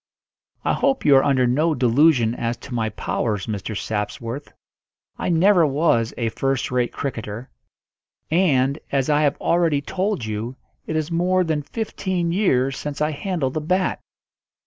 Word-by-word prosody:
"I - - +2
hope 275 -1 0
you 145 - +7
are 135 - +4
under 130 -3 +3
no 150 +6 +2
delusion 125 -1 +3
as 120 0 -2
to 135 - -10
my 115 -2 0
powers, 105 -1 -2
Mr. 105 -1 -4
Sapsworth. 115 +5 -4 0.7
I - - -1
never 175 +2 +5
was 140 -6 +2
a 115 -2 0
first 135 +2 -1
rate 125 -1 +1
cricketer, 115 -3 -5 0.8
and, 145 -5 +2
as 135 +1 +1
I 150 0 +3
have 145 -2 +2
already 170 -4 +2
told 185 - -2
you, 110 +4 -4 0.3
it 160 - -3
is 155 +1 -1
more 180 +2 +2
than 160 -3 -1
fifteen 185 -1 -3
years 135 -9 +1
since 150 -1 -5
I 150 +1 +1
handled 155 -4 -2
a - - -1
bat." 185 +4 0
140 Hz, 155 wpm, -22 LUFS, 120-165 Hz, 0.8 s, you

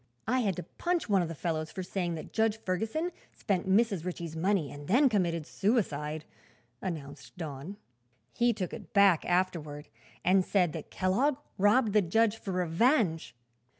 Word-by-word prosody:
"I 255 +3 +2
had 200 -7 0
to - - -5
punch 345 - -2
one 200 -3 +3
of 175 - -1
the 165 - -6
fellows 155 0 -2
for 190 - -5
saying 175 -2 -2
that 155 - -9
Judge 220 -1 +2
Ferguson 220 - -2 0.2
spent 190 -4 -2
Mrs. 200 -3 +3
Ritchie's 170 -3 -5
money 175 -2 0
and 145 0 -9
then 265 +7 +5
committed 170 -7 0
suicide," 155 - -1 0.6
announced 145 -4 -6
Don. 160 +3 -6 0.6
"He 240 0 +3
took 195 -5 -4
it - - -9
back, 200 -5 +5
afterward, 170 -5 -1 0.4
and 185 +1 +5
said 180 -5 +1
that 160 - -7
Kellogg 250 +10 +1 0.2
robbed 210 +2 +4
the 210 - +5
judge 220 +5 +2
for 200 - -6
revenge. 180 - +1
185 Hz, 160 wpm, -30 LUFS, 165-215 Hz, 0.6 s, then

